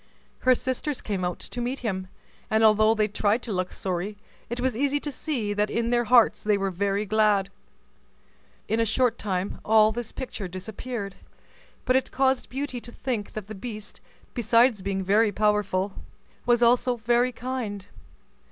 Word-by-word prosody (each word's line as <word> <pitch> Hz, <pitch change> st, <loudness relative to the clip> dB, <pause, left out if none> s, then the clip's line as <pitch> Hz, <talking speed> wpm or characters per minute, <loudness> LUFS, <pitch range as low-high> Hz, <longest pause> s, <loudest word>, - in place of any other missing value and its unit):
Her 255 Hz, 0 st, +4 dB
sisters 260 Hz, +3 st, -2 dB
came 195 Hz, -4 st, -3 dB
out 180 Hz, 0 st, -1 dB
to 245 Hz, -, -5 dB
meet 250 Hz, +3 st, -2 dB
him, 190 Hz, -3 st, -2 dB, 0.4 s
and 220 Hz, +1 st, +3 dB
although 215 Hz, 0 st, +5 dB
they 215 Hz, -1 st, +2 dB
tried 215 Hz, +3 st, 0 dB
to 225 Hz, -, -4 dB
look 185 Hz, -1 st, -1 dB
sorry, 190 Hz, +2 st, -3 dB, 0.3 s
it 240 Hz, +1 st, -3 dB
was 255 Hz, -2 st, 0 dB
easy 285 Hz, +3 st, +1 dB
to 290 Hz, -, -5 dB
see 250 Hz, -8 st, -2 dB
that 205 Hz, +1 st, +1 dB
in 235 Hz, 0 st, -1 dB
their 240 Hz, 0 st, +2 dB
hearts 230 Hz, -3 st, +5 dB
they 210 Hz, -1 st, +3 dB
were 195 Hz, -1 st, -1 dB
very 200 Hz, +3 st, 0 dB
glad. 205 Hz, -2 st, +2 dB, 1.2 s
In 220 Hz, +2 st, 0 dB
a -, -, +4 dB
short 240 Hz, +1 st, +1 dB
time 190 Hz, -2 st, -2 dB
all 215 Hz, 0 st, +5 dB
this 235 Hz, 0 st, -5 dB
picture 235 Hz, -7 st, -5 dB
disappeared, 200 Hz, +3 st, -6 dB, 0.7 s
but 255 Hz, -, +3 dB
it 260 Hz, -, +1 dB
caused 265 Hz, -1 st, +1 dB
Beauty 265 Hz, -2 st, -4 dB
to 240 Hz, -, -10 dB
think 235 Hz, -5 st, -4 dB
that 215 Hz, -3 st, -5 dB
the 215 Hz, -, -8 dB
beast, 215 Hz, 0 st, -7 dB, 0.3 s
besides 235 Hz, -1 st, +3 dB
being 195 Hz, 0 st, -2 dB
very 210 Hz, +3 st, +3 dB
powerful, 205 Hz, -2 st, +1 dB, 0.5 s
was 240 Hz, 0 st, +4 dB
also 245 Hz, +1 st, +4 dB
very 240 Hz, +2 st, +2 dB
kind. 235 Hz, -5 st, -4 dB
220 Hz, 170 wpm, -26 LUFS, 200-245 Hz, 1.2 s, although